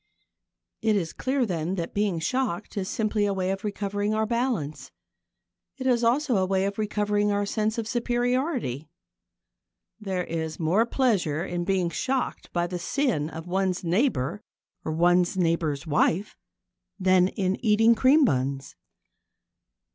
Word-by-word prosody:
It 220 -1 +2
is 170 -5 -1
clear, 260 -1 0
then, 175 -2 -2
that 170 -3 -4
being 200 -4 0
shocked 220 +1 -2
is 190 -2 -2
simply 215 -1 0
a 200 - -1
way 185 0 0
of 195 0 -4
recovering 205 0 -2
our 220 0 +1
balance. 220 - -2 0.9
It 260 - -6
is 245 -2 +2
also 250 +1 +2
a 190 - +2
way 190 0 +1
of 200 +1 -3
recovering 210 -1 0
our 205 0 0
sense 215 +2 -1
of 225 -2 -2
superiority. 240 - -1 1.1
There 190 -4 -2
is 160 -2 -4
more 180 +8 +2
pleasure 190 - +1
in 175 -2 -3
being 185 -3 +1
shocked 260 +9 -2
by 175 0 0
the 175 0 -4
sin 200 - 0
of 160 0 -8
one's 190 +1 -1
neighbour 180 - 0 0.4
or 155 - -3
one's 175 +3 +3
neighbour's 165 -4 0
wife 165 +5 +1 0.6
than 185 -1 +4
in 190 +1 -2
eating 225 +1 +5
cream 270 +6 +5
buns. 135 - -1
195 Hz, 145 wpm, -26 LUFS, 175-225 Hz, 1.1 s, eating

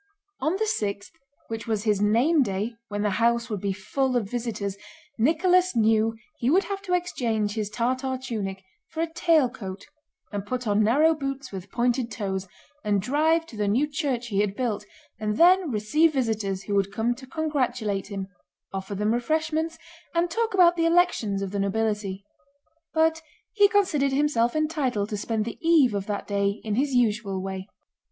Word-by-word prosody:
On 310 +6 0
the 435 +3 0
sixth, 200 - -2 0.4
which 225 0 -5
was 215 -2 -1
his 210 -3 +1
name 245 +10 +4
day 210 0 -1
when 205 -1 -3
the 210 - +1
house 235 0 +2
would 205 -3 -3
be 200 - 0
full 250 +7 -1
of 220 -5 -1
visitors, 220 -4 -3 0.4
Nicholas 355 +6 +3
knew 225 0 +3 0.2
he 240 - +1
would 370 +7 +4
have 395 -1 -4
to 365 -3 0
exchange 230 - -1
his 215 -2 -2
Tartar 255 +4 -1
tunic 205 -7 -4 0.2
for 325 - -4
a 330 0 -2
tail 325 -6 +4
coat, 195 -5 -8 0.5
and 205 -1 -3
put 250 +4 -4
on 210 0 +2
narrow 295 +9 +4
boots 275 -2 -5
with 190 0 -7
pointed 240 0 +1
toes, 195 -3 -3 0.4
and 205 -1 +2
drive 310 - +2
to 245 - -12
the 210 -1 -1
new 240 +9 +3
church 275 -5 -2
he 200 -2 0
had 205 -1 +1
built, 220 -4 -2 0.3
and 210 -1 -1
then 360 0 +5
receive 275 +9 +2
visitors 220 -7 -1
who 205 - -4
would 200 -1 +1
come 225 +4 0
to 260 +2 -12
congratulate 255 -10 -1
him, 195 -2 -5 0.5
offer 195 +1 -4
them 210 +3 +1
refreshments, 315 +5 -1 0.4
and 340 0 +1
talk 455 +1 0
about 350 -2 +6
the 330 -1 +1
elections 285 - +2
of 195 - -4
the 200 - -2
nobility; 200 -1 -1 0.7
but 320 0 +2 0.3
he 410 -1 +6
considered 340 -10 +2
himself 270 -4 +2
entitled 285 -10 0
to 210 - -2
spend 215 +1 -2
the 230 - -6
eve 320 -8 +4
of 200 -1 -3
that 205 -1 -3
day 200 0 0
in 215 - -2
his 265 +4 +1
usual 215 -5 +1
way. 190 0 -5
235 Hz, 180 wpm, -26 LUFS, 205-305 Hz, 0.7 s, about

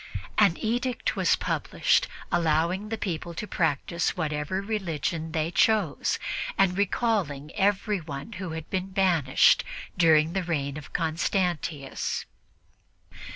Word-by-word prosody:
An 200 -5 +5
edict 245 +2 -1
was - - +3
published - - +1 0.2
allowing 170 +4 +1
the 225 - -2
people 170 -4 -4
to 210 - -4
practice 170 0 0
whatever 155 +2 -1
religion 170 -6 -2
they 160 +1 -1
chose 205 -3 +2 0.4
and 190 -2 +3
recalling 190 - 0
everybody 195 -4 -1
who 185 -4 -5
had 160 -1 -6
been 190 0 -1
banished 185 -8 +4 0.3
during 160 -1 +4
the 195 - 0
reign 145 -5 -2
of 150 -2 -9
Constantius. 165 -3 -1
175 Hz, 110 wpm, -27 LUFS, 155-195 Hz, 0.4 s, An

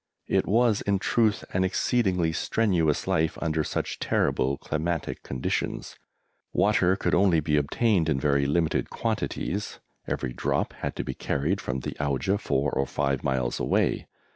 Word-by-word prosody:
It - - +1
was 115 0 +3
in 100 -1 +1
truth 110 +1 +1
an 90 - +2
exceedingly 95 -4 +1
strenuous 85 -6 +1
life 80 0 +1
under 80 -2 0
such - - -3
terrible 70 +2 +1
climatic 80 +2 -3
conditions. 65 -1 -3 0.6
Water 95 -3 +3
could - - -1
only 90 -3 +4
be 75 0 0
obtained 85 +4 +2
in 70 - +1
very 70 0 +2
limited 80 +2 +1
quantities; 100 +3 -3 0.3
every 60 - -2
drop - - -1
had - - -5
to - - -3
be - - -4
carried 85 +8 -1
from 65 0 -3
the - - -4
Auja 75 +8 0
four 70 +1 0
or 70 - 0
five 70 -2 -1
miles 65 -3 0
away. - - +1
80 Hz, 150 wpm, -26 LUFS, 70-95 Hz, 0.6 s, only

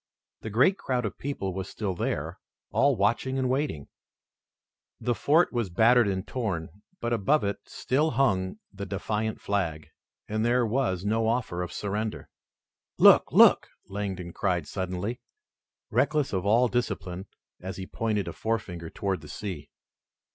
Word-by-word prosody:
The 110 - -5
great 130 - +3
crowd 125 -3 -1
of 105 - -5
people 115 -9 -3
was 95 +1 -5
still 100 -4 -3
there, 85 - -3 0.3
all 140 0 +3
watching 115 +6 +1
and 130 -1 +1
waiting, 130 - -1 1.1
The 120 - 0
fort 155 +8 +3
was 120 -5 -1
battered 115 +5 +5
and 95 -1 -2
torn, 100 -11 -2 0.3
but 120 0 -1
above 120 +7 +2
it 100 0 -1
still 150 +5 0
hung 95 -10 +1 0.2
the 100 0 -6
defiant 105 +3 -2
flag, 85 -6 -2 0.4
and 110 +1 -1
there 120 +1 +3
was 110 -6 0
no 110 +2 +1
offer 110 -7 -1
of 90 - -4
surrender. 105 +2 -3 0.7
"Look! - - +7
Look!" - - +6 0.2
Langdon 95 -4 -4
cried 90 -5 0
suddenly, 95 +5 -3 0.7
reckless 150 -6 +1
of 95 +1 -1
all 120 +4 +5
discipline, 95 -6 -3 0.3
as 95 +2 -6
he 95 - -5
pointed 105 -1 -1
a - - -4
forefinger 90 -7 -3
toward 95 -2 -2
the 75 - -11
sea. 80 -3 -6
105 Hz, 145 wpm, -27 LUFS, 95-120 Hz, 1.1 s, Look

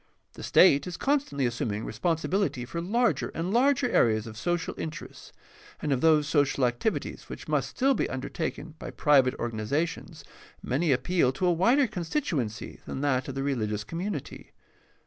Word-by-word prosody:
The - - -11
state 140 +5 +5
is 180 - -5
constantly 275 - 0
assum 120 0 -1
ing 105 +2 -4
responsibility 165 - -1
for 170 +7 -4
larger 235 +7 +1
and 175 +4 -2
larger 265 +2 +3
areas 110 - +2
of 110 -1 -8
social 175 +9 -2
interests, 155 -1 -8 0.5
and 150 - -2
of 130 - -1
those 155 -2 +4
social 145 -3 +2
activities 125 - -2
which - - -8
must - - 0
still 270 +1 +2
be - - -1
undertaken 155 +4 -4
by - - -6
private 135 -4 +3
organizations 120 +9 -3 0.4
many 145 +5 +1
appeal 135 +1 +2
to 180 - -2
a 175 - +4
wider 235 - +4
constituency 170 - -3
than 135 - -4
that 130 -3 +1
of 135 - -5
the 135 - -2
rehgious 110 -6 -2
community. 175 - -5
150 Hz, 160 wpm, -27 LUFS, 130-180 Hz, 0.5 s, state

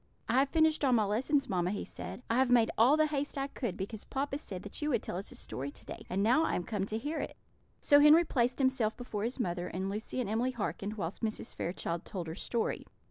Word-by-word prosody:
"I 245 +3 +3
have 275 +1 +3
finished 315 -1 +3
all 265 -3 +4
my 225 -3 +4
lessons, 265 +7 +1
mamma," 180 -5 0
he 200 - -3
said. 250 - -7
"I 230 - +1
have 260 -1 +3
made 240 -2 +5
all 255 +7 +5
the 310 - +4
haste 290 -1 -2
I 275 - 0
could 240 -8 -4
because 200 +2 -5
papa 275 +1 -2
said 190 -10 -7
that 205 - -7
you 300 - 0
would 240 -6 +1
tell - - -4
us 195 - -5
a - - -10
story 140 +2 -4
to - - -12
day; - - -9
and 195 +2 0
now 250 +9 +4
I - - +1
am 180 - -1
come 200 0 -2
to 215 - -2
hear 295 +8 -3
it." - - -5 0.4
So 285 - +6
Henry 305 +4 +7
placed 250 -4 +1
himself 260 -5 +1
before 220 -4 -3
his 245 +3 -3
mother, 175 -5 -1
and 190 +2 -3
Lucy 215 +5 -3
and 245 - -1
Emily 235 +5 0
hearkened, 210 -2 -3
whilst 190 -3 -4
Mrs. 220 0 -3
Fairchild 170 -1 -3
told 185 -5 -5
her 160 - -5
story. 230 +4 -2
230 Hz, 250 wpm, -32 LUFS, 200-275 Hz, 0.4 s, Henry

